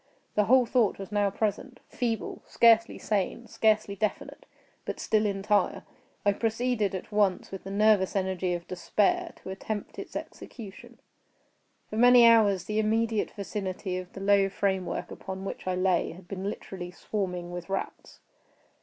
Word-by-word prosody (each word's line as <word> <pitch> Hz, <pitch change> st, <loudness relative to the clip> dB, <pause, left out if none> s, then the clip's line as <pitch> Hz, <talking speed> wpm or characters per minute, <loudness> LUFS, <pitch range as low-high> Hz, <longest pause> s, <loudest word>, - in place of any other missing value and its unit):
The 210 Hz, -, +2 dB
whole 255 Hz, +2 st, +5 dB
thought 235 Hz, -3 st, +2 dB
was 195 Hz, +1 st, -8 dB
now 205 Hz, -1 st, +2 dB
present—feeble, 225 Hz, +2 st, -3 dB
scarcely 230 Hz, -1 st, +4 dB
sane, 210 Hz, +3 st, -2 dB
scarcely 215 Hz, -2 st, +1 dB
definite,—but 215 Hz, +1 st, -6 dB
still 215 Hz, -1 st, +2 dB
entire. 200 Hz, +1 st, 0 dB, 0.4 s
I 205 Hz, -, +4 dB
proceeded 225 Hz, -2 st, 0 dB
at 190 Hz, -, -7 dB
once, 205 Hz, -3 st, +1 dB
with 195 Hz, -1 st, -8 dB
the -, -, -5 dB
nervous 205 Hz, -1 st, +3 dB
energy 185 Hz, -2 st, 0 dB
of 170 Hz, 0 st, -7 dB
despair, 330 Hz, -, 0 dB
to 190 Hz, -, -6 dB
attempt 205 Hz, +2 st, -5 dB
its -, -, -8 dB
execution. 210 Hz, -6 st, -9 dB, 0.9 s
For 215 Hz, -, -6 dB
many 245 Hz, 0 st, +7 dB
hours 205 Hz, -5 st, +5 dB
the 210 Hz, +3 st, -1 dB
immediate 220 Hz, 0 st, +1 dB
vicinity 195 Hz, -2 st, -4 dB
of 185 Hz, 0 st, -10 dB
the 195 Hz, -, -8 dB
low 195 Hz, 0 st, +4 dB
framework 190 Hz, -2 st, -2 dB
upon 190 Hz, 0 st, -7 dB
which 195 Hz, -, -6 dB
I 185 Hz, -, +1 dB
lay 185 Hz, -2 st, +1 dB
had 175 Hz, +1 st, -14 dB
been 190 Hz, 0 st, -5 dB
literally 185 Hz, -3 st, -7 dB
swarming 180 Hz, -2 st, -4 dB
with 175 Hz, +1 st, -7 dB
rats. 195 Hz, -, -5 dB
200 Hz, 145 wpm, -28 LUFS, 190-220 Hz, 0.9 s, many